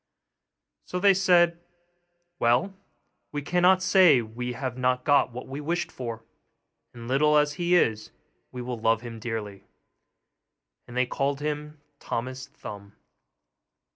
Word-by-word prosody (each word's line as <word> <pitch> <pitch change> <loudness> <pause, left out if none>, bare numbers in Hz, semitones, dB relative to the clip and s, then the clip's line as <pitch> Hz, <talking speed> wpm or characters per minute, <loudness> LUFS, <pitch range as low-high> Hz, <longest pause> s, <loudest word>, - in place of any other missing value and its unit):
So 180 - -4
they 200 +1 +6
said, 175 -3 +3 0.8
'Well, 120 +12 +2 0.6
we 145 -1 -4
cannot 180 +3 +3
say 180 - +5
we 125 +3 -5
have 125 0 -4
not 125 0 0
got 145 -3 +3
what 125 +2 -8
we 140 +2 -6
wished 170 +4 -2
for, 115 -3 -6 0.7
and, 115 -1 -10
little 150 +4 +3
as 150 0 +2
he 175 +3 +1
is, 110 -10 +1 0.4
we 125 -1 -6
will 120 -1 -5
love 115 0 +2
him 115 -2 -8
dearly.' 105 -4 -5 1.2
And 120 - -8
they 125 - +3
called 140 +2 -2
him 150 0 -5 0.2
Thomas 130 +2 -5
Thumb. 100 -1 -11
130 Hz, 135 wpm, -26 LUFS, 120-160 Hz, 1.2 s, they